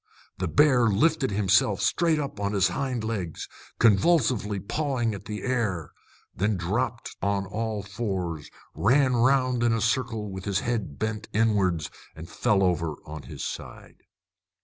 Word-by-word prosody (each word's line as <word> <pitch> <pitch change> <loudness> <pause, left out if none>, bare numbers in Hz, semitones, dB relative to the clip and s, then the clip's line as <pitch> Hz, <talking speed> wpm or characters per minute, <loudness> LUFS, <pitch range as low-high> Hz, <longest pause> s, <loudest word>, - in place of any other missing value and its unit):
The 95 - -1
bear 125 - +4
lifted 135 +7 +2
himself 100 0 +2
straight 165 -3 +2
up 140 -8 -4
on 100 0 -1
his 100 -1 +3
hind 130 -4 -2
legs, 100 -8 -4 0.3
convulsively 110 - +3
pawing 120 - -1
at 100 - -8
the 105 0 -5
air, 110 - -1 0.4
then 105 +2 0
dropped 115 +7 -2
on 100 -1 0
all 110 +1 -3
fours, 95 -7 -4 0.2
ran 130 +3 +3
round 130 0 +3
in 120 -1 +3
a 115 - +1
circle 115 -2 -1
with 95 0 -7
his 100 -1 0
head 110 -12 -3
bent 110 0 -3
inwards, 100 -7 +1 0.2
and 80 +1 -9
fell 100 +3 +1
over 85 -4 0
on 75 -1 -7
his - - -6
side. - - -8
105 Hz, 150 wpm, -26 LUFS, 95-120 Hz, 0.4 s, bear